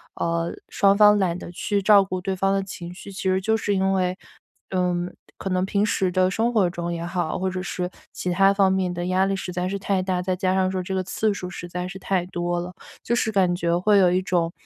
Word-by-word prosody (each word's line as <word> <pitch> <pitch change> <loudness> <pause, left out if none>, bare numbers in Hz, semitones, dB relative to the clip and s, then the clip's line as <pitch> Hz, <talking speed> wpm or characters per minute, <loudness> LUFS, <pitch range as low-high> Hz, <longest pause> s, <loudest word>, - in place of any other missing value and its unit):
呃， 170 0 -1 0.2
双 200 0 +3
方 210 0 +6
懒 180 -3 0
得 175 - -8
去 200 +3 -1
照 200 0 +7
顾 185 -1 -4
对 190 +1 -2
方 195 +1 +1
的 195 0 0
情 175 -2 -8
绪， 195 +2 -10
其 195 - -7
实 190 0 +2
就 220 +4 +1
是 205 -2 0
因 190 0 +1
为， 185 -1 0 0.5
嗯， 180 -1 -1 0.2
可 195 - -4
能 185 0 +1
平 200 +1 +1
时 190 -3 0
的 185 +1 +2
生 225 +4 +1
活 205 -5 +3
中 175 -1 -4
也 170 0 -4
好， 175 -2 -2
或 190 - -1
者 185 0 -4
是 180 -1 -3 0.2
其 180 - -3
它 195 +2 +5
方 195 -1 +3
面 190 -1 0
的 175 0 -3
压 185 +1 +2
力 195 - 0
实 190 -1 -5
在 180 +1 -1
是 200 - -2
太 195 -1 0
大。 185 -1 -1
再 185 0 -1
加 185 0 0
上 190 -1 +2
说 190 -1 -2
这 190 +1 -4
个 185 - 0
次 215 +4 0
数 185 -2 -6
实 175 -1 -7
在 180 +1 -4
是 190 +1 -8
太 185 -2 0
多 175 -1 -2
了， 175 +1 -6 0.3
就 235 - 0
是 220 -2 0
感 185 -4 +2
觉 170 -1 0
会 205 +3 +3
有 180 -2 +5
一 180 - +2
种， 175 -3 0
185 Hz, 275 characters per minute, -24 LUFS, 180-195 Hz, 0.5 s, 照